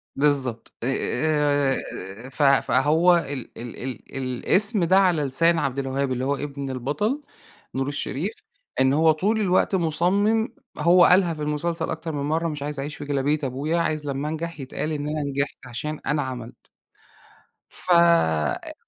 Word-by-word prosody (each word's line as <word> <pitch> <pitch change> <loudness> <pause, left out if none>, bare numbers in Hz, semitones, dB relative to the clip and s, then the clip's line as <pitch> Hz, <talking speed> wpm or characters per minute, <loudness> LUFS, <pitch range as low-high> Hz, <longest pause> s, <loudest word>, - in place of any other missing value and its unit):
بالضبط، 135 -5 0
آآ، 145 +1 +1 0.5
آآ - - -9
ف 135 - -6
فهو 150 +5 +4
ال 140 -6 -4
ال 120 0 -7
ال 130 -4 -5 0.2
الأسم 185 - +2
ده، 185 +3 +4
على 180 -5 +3
لسان 165 +5 +3
عبدالوهاب، 135 -1 -1
اللي 130 +1 -1
هو 140 +1 +1
إبن 140 -1 -5
البطل 145 - -2 0.5
نور 135 +1 -1
الشريف، 145 +5 -3 0.5
إن 130 0 +4
هو 160 +2 +5
طول 205 +8 0
الوقت 190 0 +2
مُصمم 190 +7 +2 0.3
هو 175 +3 +6
قالها 180 -2 +4
في 155 - -8
المسلسل 160 +3 -2
أكتر 160 0 -4
من 145 - -3
مرة: 160 +3 0
"مش 150 -2 -4
عايز 145 -1 -4
أعيش 145 +2 -4
في 145 - -8
جلابية 145 +1 0
أبويا، 140 +5 -1
عايز 155 -2 -1
لما 140 +2 -2
انجح 165 0 -5
يتقال 135 +3 -4
إن 145 -1 -3
أنا 155 0 -2
نجحت 140 0 -2
علشان 150 +5 -5
أنا 150 +1 +1
عملت." 125 -3 -6 1.1
ف 185 - -3
أ 165 - +3
150 Hz, 155 wpm, -24 LUFS, 135-170 Hz, 1.1 s, هو